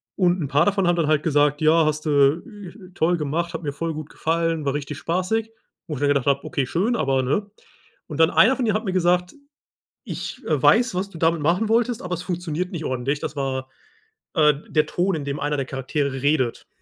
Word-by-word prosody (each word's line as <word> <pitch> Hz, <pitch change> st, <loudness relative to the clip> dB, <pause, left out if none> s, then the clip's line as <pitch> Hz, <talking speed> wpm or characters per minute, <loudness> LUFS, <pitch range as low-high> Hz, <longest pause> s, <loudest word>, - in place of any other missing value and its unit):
Und 180 Hz, -2 st, +2 dB
'n 140 Hz, -, -3 dB
paar 145 Hz, +4 st, +3 dB
davon 195 Hz, -2 st, +1 dB
haben 175 Hz, 0 st, +2 dB
dann 160 Hz, -3 st, +1 dB
halt 155 Hz, -1 st, +2 dB
gesagt: 145 Hz, -1 st, +2 dB
„Ja, 160 Hz, +1 st, +4 dB
hast 155 Hz, 0 st, -1 dB
du, 145 Hz, +2 st, +3 dB
äh, 200 Hz, -4 st, -12 dB
toll 175 Hz, 0 st, +2 dB
gemacht, 165 Hz, +3 st, -2 dB
hat 165 Hz, 0 st, -5 dB
mir 145 Hz, -, -2 dB
voll 165 Hz, +3 st, -3 dB
gut 155 Hz, 0 st, -7 dB
gefallen, 165 Hz, -1 st, -1 dB
war 140 Hz, -, 0 dB
richtig 145 Hz, -1 st, -4 dB
spaßig.“ 185 Hz, +8 st, -1 dB, 0.4 s
Wo 155 Hz, -, -4 dB
ich 140 Hz, -, -5 dB
dann 145 Hz, -, +2 dB
gedacht 140 Hz, -3 st, +1 dB
habe: 140 Hz, 0 st, +2 dB
„Okay, 135 Hz, -, -2 dB
schön, 210 Hz, -, 0 dB
aber“, 135 Hz, -1 st, +1 dB
ne? 200 Hz, +11 st, -1 dB, 0.6 s
Und 155 Hz, -1 st, -7 dB
dann 160 Hz, -, +6 dB
einer 265 Hz, +4 st, +5 dB
von 250 Hz, -, 0 dB
denen 215 Hz, -1 st, +1 dB
hat 220 Hz, -, -1 dB
mir 190 Hz, -, -1 dB
gesagt: 180 Hz, 0 st, +1 dB, 0.7 s
„Ich, -, -, -6 dB
äh, -, -, +1 dB
weiß, 240 Hz, -6 st, +4 dB
was 195 Hz, +2 st, -2 dB
du 170 Hz, -, -11 dB
damit 165 Hz, -1 st, +1 dB
machen 180 Hz, +8 st, +1 dB
wolltest, 235 Hz, +1 st, +1 dB
aber 180 Hz, 0 st, -3 dB
es 175 Hz, -, -7 dB
funktioniert 175 Hz, -1 st, -3 dB
nicht 160 Hz, -4 st, -5 dB
ordentlich.“ 130 Hz, +3 st, -1 dB
Das -, -, -5 dB
war, 130 Hz, -1 st, -3 dB, 0.7 s
äh, 150 Hz, -2 st, +5 dB, 0.2 s
der 155 Hz, -1 st, +2 dB
Ton, 180 Hz, +3 st, 0 dB
in 145 Hz, -3 st, -4 dB
dem 140 Hz, +1 st, -3 dB
einer 145 Hz, 0 st, -1 dB
der 135 Hz, -, -2 dB
Charaktere 135 Hz, 0 st, -3 dB
redet. 140 Hz, -5 st, 0 dB
160 Hz, 225 wpm, -23 LUFS, 145-180 Hz, 0.7 s, dann